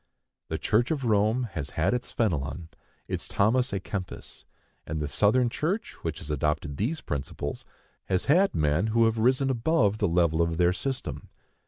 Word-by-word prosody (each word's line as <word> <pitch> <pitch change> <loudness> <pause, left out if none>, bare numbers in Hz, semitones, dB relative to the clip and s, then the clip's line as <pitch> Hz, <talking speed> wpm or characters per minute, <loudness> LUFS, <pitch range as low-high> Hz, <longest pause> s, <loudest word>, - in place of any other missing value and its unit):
The - - -2
Church 120 +3 +1
of 150 -4 -1
Rome 110 +3 +2
has 75 -4 -4
had 80 +8 +2
its 125 0 -2
Fenelon, 80 - -1 0.4
its - - -3
Thomas 120 +5 +2
â 100 - -2
Kempis; 95 -1 -7 0.4
and 80 0 -3
the 75 - -2
Southern 105 - +3
Church, 180 - -2
which 80 -2 -3
has 75 -1 -6
adopted 75 0 -1
these 150 +11 -1
principles, 70 0 -4 0.4
has 95 -1 0
had 185 +7 +4
men 75 +6 +2
who 115 +1 +3
have 115 0 +1
risen 130 +3 +3
above 115 -5 +2
the 105 - +2
level 85 -1 +2
of 85 -1 0
their 90 0 +3
system. 130 +8 -4
100 Hz, 170 wpm, -27 LUFS, 80-125 Hz, 0.4 s, had